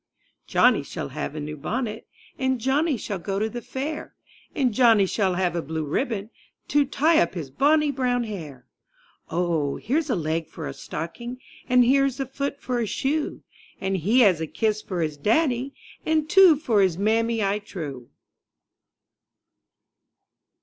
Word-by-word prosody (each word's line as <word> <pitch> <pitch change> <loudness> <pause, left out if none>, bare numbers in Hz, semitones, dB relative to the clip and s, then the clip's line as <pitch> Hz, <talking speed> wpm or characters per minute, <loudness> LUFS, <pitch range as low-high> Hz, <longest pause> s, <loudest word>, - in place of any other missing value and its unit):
JOHNNY - - +4
shall - - -6
have - - -5
a - - -4
new 150 +1 -5
bonnet. 220 - -4 0.3
And 260 -1 +1
Johnny 275 +4 +1
shall 200 -3 -4
go 195 +3 -3
to 215 +2 +1
the 240 +2 -6
fair. 290 +6 -5 0.4
And 260 -6 +1
Johnny 225 -4 +5
shall 190 -1 0
have 180 -1 0
a 170 - 0
blue 160 0 -4
ribbo 215 - -2 0.4
To 290 -1 +3
tie 310 +4 +3
up 170 +2 0
his 150 -6 -5
bonny 295 - +3
brown 250 -2 0
hair. 155 - -7 0.6
Oh, 165 -5 0
here's 295 +6 -1
a 245 - +2
leg 160 -1 -2
for 160 - -7
a - - -5
stocking. 235 +11 -6 0.3
And 250 0 +5
here's 275 +1 +2
a 270 - -1
foot 280 +2 -4
for 250 -1 -2
a 230 - -1
shoe. 295 +8 -2 0.4
And 190 0 -1
he 215 +9 +3
has 185 -8 +4
a 160 - -2
kiss 215 +5 -1
for 180 -5 -4
his 155 -2 -3
daddy. 255 - +1 0.3
And 310 -1 +1
two 360 -1 +7
for 240 -9 +1
his 185 -4 +2
mammy, 225 +2 +1
I 200 +1 +1
trow. 145 - -7
225 Hz, 165 wpm, -24 LUFS, 175-265 Hz, 0.6 s, two